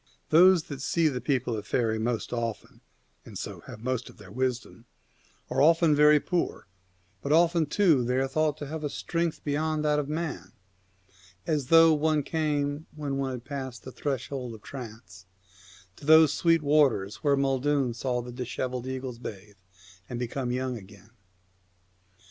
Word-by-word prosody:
Those 180 +1 +6
that 140 -4 -8
see 160 +4 +2
the 125 -3 -4
people 130 -4 0
of 105 - -6
faery 110 -3 0
most 120 +1 -2
often, 115 -4 -4 0.4
and - - -10
so - - -6
have - - -8
the 110 - -16
most 125 -1 -2
of - - -16
their 95 - -13
wisdom, 125 0 -3 0.6
are - - 0
often 165 0 +5
very 150 0 +6
poor, 175 +3 -2 0.6
but 140 - -3
often, 165 0 +4
too, 160 -6 +3
they 125 +2 0
are 135 +1 +1
thought 155 +1 0
to 145 - -6
have 155 +2 -6
a 145 - -1
strength 170 +2 -3
beyond 155 +1 -1
that 150 0 +2
of 145 -1 -3
man, 150 - -4 0.9
as 145 -5 -1
though 165 +1 +7
one 155 0 +1
came, 150 -1 -1
when 145 -3 -3
one 135 -1 -2
has 125 - -6
passed 130 -1 -6
the 130 - -8
threshold 130 -2 -4
of 105 - -15
trance, 105 -8 -10 0.7
to - - -12
those 160 -1 +7
sweet 165 -2 +2
waters 135 -9 +2
where 140 -2 +1
Maeldun 135 -1 +1
saw 125 0 -2
the 125 - -8
dishevelled 125 0 -4
eagles 130 -2 -5
bathe 105 -3 -9 0.5
and 125 - -4
become 125 +1 -3
young 125 -1 -2
again. 100 +1 -16
135 Hz, 165 wpm, -27 LUFS, 120-150 Hz, 0.9 s, though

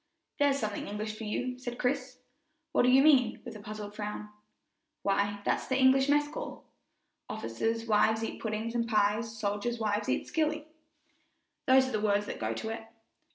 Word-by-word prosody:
"There's 285 -1 +4
something 215 -5 -3
English 215 +1 -4
for 220 - -7
you," 250 +4 -2
said 245 -1 -5
Chris. 255 0 -1 0.5
"What - - +3
do 250 - +4
you 265 +2 +6
mean?" 265 -7 +5
with 215 - -8
puzzled 210 0 -7
frown. 210 0 -5 0.7
"Why, 200 +1 0
that's - - 0
the 260 - +1
English 265 +1 +5
mess 295 0 +4
call, - - -7 0.6
"'Officers' 225 - -2
wives 220 0 +3
eat - - -5
puddings 220 +1 -2
and 235 -1 0
pies, 215 +1 +1
Soldiers' 210 +3 -1
wives 210 -2 -1
eat - - 0
skilly' 310 -2 0 1.0
those 260 0 +6
are - - -4
the 215 - -1
words 205 -1 +2
that - - -6
go 110 0 -1
to 220 - -4
it." 225 - -4
225 Hz, 170 wpm, -30 LUFS, 210-260 Hz, 1.0 s, you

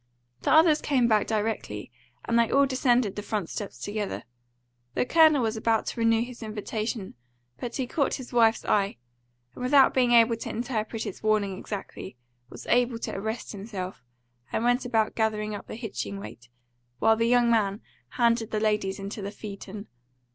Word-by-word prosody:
The - - 0
others 315 -1 +6
came 255 -5 +2
back 215 -2 +2
directly, 210 - -2 0.3
and 235 0 +2
they 230 - +3
all 280 +1 +4
descended 250 -5 +2
the 205 - -4
front 205 -4 -3
steps 205 - -5
together. 205 -1 -4 0.7
The - - +1
Colonel 310 -2 +5
was 220 0 0
about 225 0 +1
to - - -5
renew 230 0 +3
his 245 0 -9
invitation, 215 -1 -4 0.5
but 240 -1 -5
he 265 - -1
caught 280 +2 0
his 260 -1 -9
wife's 230 -1 +3
eye, 200 -5 +1 0.6
and, - - -10
without 265 +1 +5
being 250 -2 +3
able 230 -1 +5
to - - -6
interpret 225 -1 -3
its 205 - -6
warning 210 -3 +1
exactly, 195 - -7 0.3
was - - -10
able 245 -1 +2
to - - -5
arrest 220 +4 -4
himself, 195 - -6 0.5
and 225 - -1
went 245 +2 +2
about 225 -3 +1
gathering 215 -1 -1
up 205 - -7
the - - -7
hitching 195 - -5
weight, 115 +4 -11 0.5
while 225 - +4
the 230 +1 +1
young 240 -1 +4
man 205 -2 +1 0.4
handed 230 -2 +2
the 215 - -1
ladies 210 -3 0
into 200 +2 -6
the 200 - -4
phaeton. 205 0 -8
225 Hz, 175 wpm, -27 LUFS, 205-240 Hz, 0.7 s, others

